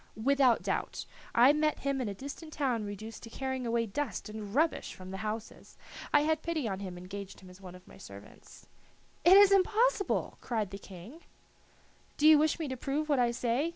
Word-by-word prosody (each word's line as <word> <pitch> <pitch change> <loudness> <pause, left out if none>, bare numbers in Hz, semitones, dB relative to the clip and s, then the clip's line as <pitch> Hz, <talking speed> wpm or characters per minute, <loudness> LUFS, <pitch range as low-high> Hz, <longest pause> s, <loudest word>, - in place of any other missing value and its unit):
"Without 265 +1 +3
doubt. - - -3 0.3
I 250 +5 +7
met 305 0 0
him 275 -1 -1
in 235 - -2
a 200 - -5
distant 285 - -9
town 255 -7 -1
reduced 210 +2 -7
to 230 - -10
carrying 260 0 -4
away 230 0 +1
dust 225 -1 -4
and 210 0 -7
rubbish 320 +3 0
from 185 0 -10
the 190 - -5
houses. 215 +2 -6 0.3
I - - +5
had 315 +1 +1
pity 315 -7 -2
on 195 -2 -3
him 185 -3 -7
and 175 - -10
engaged 200 +1 -8
him 185 -1 -13
as 180 +2 -16
one 180 -1 -10
of 180 0 -16
my - - -15
servants." 100 0 -13 0.6
"It 370 +3 +8
is 400 -1 +7
impossible!" 425 +3 +2
cried 220 -5 -2
the 195 - -7
King. 200 - -12 1.0
"Do 300 - +4
you 310 -1 +8
wish 310 0 +2
me 320 -3 -3
to 260 - -3
prove 290 +5 -2
what 285 -3 +3
I 240 -1 +3
say? 240 +6 0
245 Hz, 205 wpm, -30 LUFS, 205-300 Hz, 1.0 s, It